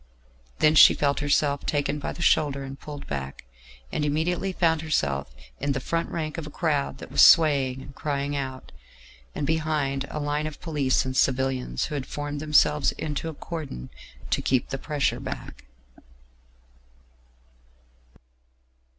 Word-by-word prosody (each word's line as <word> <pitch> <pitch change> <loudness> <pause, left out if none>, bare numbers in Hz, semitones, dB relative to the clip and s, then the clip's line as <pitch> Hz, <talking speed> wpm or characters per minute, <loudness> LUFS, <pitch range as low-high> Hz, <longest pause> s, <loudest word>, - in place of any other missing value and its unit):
Then 155 0 +4
she 155 - +8
felt 140 -1 +1
herself 145 -1 +1
taken 145 0 -1
by - - -4
the 170 - -5
shoulder 140 -4 +2
and 135 +1 -8
pulled 145 -2 -8
back, 65 -2 -6 0.5
and - - -1
immediately 165 +6 0
found 165 -3 +1
herself 70 - -1 0.3
in 140 +1 0
the 135 - -2
front 165 +5 -2
rank 155 -1 -3
of 155 - -7
a - - -7
crowd 150 -3 -1
that - - -10
was - - +4
swaying 135 -6 +5
and 140 - -12
crying 140 0 -2
out, 130 -2 -5 0.6
and - - -2
behind 150 -3 -1
a 150 - -4
line 145 +1 -1
of 155 - -9
police 145 -7 0
and 130 0 -4
civilians 130 - +1
who - - -6
had 140 -3 -3
formed 145 0 -4
themselves 150 0 +3
into 155 +1 -4
a 160 - -8
cordon 145 - -7 0.4
to - - +1
keep 130 -2 +1
the 135 - -4
pressure 150 -1 -1
back. - - -7
145 Hz, 150 wpm, -26 LUFS, 135-155 Hz, 0.6 s, she